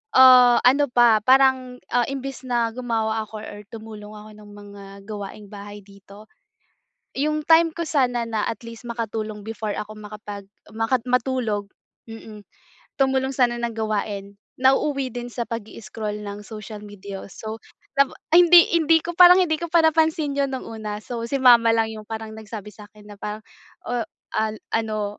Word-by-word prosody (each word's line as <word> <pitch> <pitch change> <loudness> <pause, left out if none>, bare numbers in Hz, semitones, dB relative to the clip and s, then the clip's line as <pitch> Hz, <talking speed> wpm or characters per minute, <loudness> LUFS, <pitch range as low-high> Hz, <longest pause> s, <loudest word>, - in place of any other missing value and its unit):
ah, 250 -2 +8
ano 280 +3 +5
pa, 235 -3 +5
parang, 260 -1 +3
ah, 245 -1 +2
imbes 270 -1 -6
na 235 -2 0
gumawa 225 -3 -1
ako 215 0 -9
or 205 - -9
tumulong 215 -2 -10
ako 210 0 -12
ng 205 0 -14
mga 205 -1 -12 0.2
gawaing 205 -1 -7
bahay 205 0 -9
dito, 200 +1 -16 0.9
yung 305 +2 0
time 330 0 +5
ko 340 - -3
sana 250 -5 +1
na 220 -2 -1
at 225 - -5
least 230 -1 -10
makatulong 220 -2 -4
before 220 -1 -4
ako 210 0 -6
makapag 210 -1 -9 0.3
maka 225 +3 +1
matulog, 245 -5 -1 0.4
mm, 220 -2 -10 0.6
tumulong 265 0 +1
sana 240 -2 +2
ng 235 -1 -3
gawain, 205 -2 -3 0.3
nauuwi 270 0 +2
din 245 0 -5
sa 235 - -4
pag-i-scroll 215 -2 -6
ng 205 0 -7
social 215 -1 -8
media, 200 -1 -9
oh, - - -10
so 220 +2 -7 0.4
tapo 275 -1 +3 0.2
hindi 345 0 +8
hindi 325 0 +4
ko, 345 - -4
parang 360 +1 +9
hindi 315 -3 0
ko 340 - -3
pa 340 - +5
napansin 315 -2 +2
'yon 275 -1 +1
nung 260 - -6
una. 215 -2 -5
So, 235 0 -5
si 275 - -1
mama 235 -2 +7
lang 225 0 +1
yung 215 -1 -10
parang 220 0 -6
nagsabi 210 -1 -8
sa'kin 210 +1 -16
na 205 - -11
parang, 210 +1 -6 0.5
oh, 240 -2 -1 0.3
ah, 220 0 0 0.2
ano, 215 -2 -2
225 Hz, 165 wpm, -23 LUFS, 210-260 Hz, 0.9 s, parang